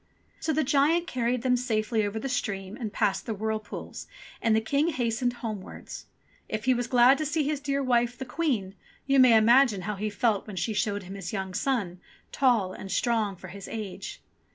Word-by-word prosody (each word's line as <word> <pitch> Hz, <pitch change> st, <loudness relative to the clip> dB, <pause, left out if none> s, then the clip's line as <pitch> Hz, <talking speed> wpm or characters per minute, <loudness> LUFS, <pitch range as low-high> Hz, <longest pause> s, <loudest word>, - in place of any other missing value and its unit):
So 320 Hz, -, -1 dB
the 310 Hz, +1 st, +1 dB
giant 295 Hz, +5 st, +3 dB
carried 245 Hz, -4 st, -1 dB
them 255 Hz, -1 st, +3 dB
safely 220 Hz, -2 st, 0 dB
over 205 Hz, +1 st, -2 dB
the 220 Hz, -, -3 dB
stream 200 Hz, -6 st, -3 dB
and 225 Hz, -4 st, -5 dB
past 195 Hz, 0 st, 0 dB
the 225 Hz, -, -2 dB
whirlpools, 215 Hz, 0 st, -5 dB, 0.3 s
and 225 Hz, -1 st, +3 dB
the -, -, +4 dB
King 280 Hz, +8 st, +1 dB
hastened 245 Hz, -4 st, 0 dB
homewards. 210 Hz, -4 st, -7 dB, 0.4 s
If 215 Hz, -1 st, -3 dB
he 260 Hz, -, +5 dB
was 245 Hz, -1 st, -2 dB
glad 250 Hz, +3 st, +5 dB
to -, -, 0 dB
see 305 Hz, +1 st, 0 dB
his 295 Hz, 0 st, -1 dB
dear 280 Hz, -1 st, -1 dB
wife, 240 Hz, -1 st, +1 dB
the 265 Hz, -, -5 dB
Queen, 250 Hz, -, -1 dB, 0.3 s
you 275 Hz, 0 st, +3 dB
may 250 Hz, -3 st, +7 dB
imagine 235 Hz, -2 st, +5 dB
how 210 Hz, +3 st, -2 dB
he 215 Hz, +2 st, -2 dB
felt 210 Hz, 0 st, 0 dB
when 210 Hz, -, -7 dB
she 185 Hz, +5 st, -1 dB
showed 205 Hz, -1 st, -1 dB
him 185 Hz, +1 st, -9 dB
his 200 Hz, +3 st, -6 dB
young 190 Hz, -2 st, -3 dB
son, 195 Hz, -7 st, -1 dB, 0.3 s
tall 230 Hz, -9 st, +2 dB
and 195 Hz, -, -8 dB
strong 215 Hz, 0 st, +1 dB
for 185 Hz, +1 st, -11 dB
his 195 Hz, +1 st, -9 dB
age. 215 Hz, -4 st, -6 dB
230 Hz, 200 wpm, -27 LUFS, 205-260 Hz, 0.4 s, may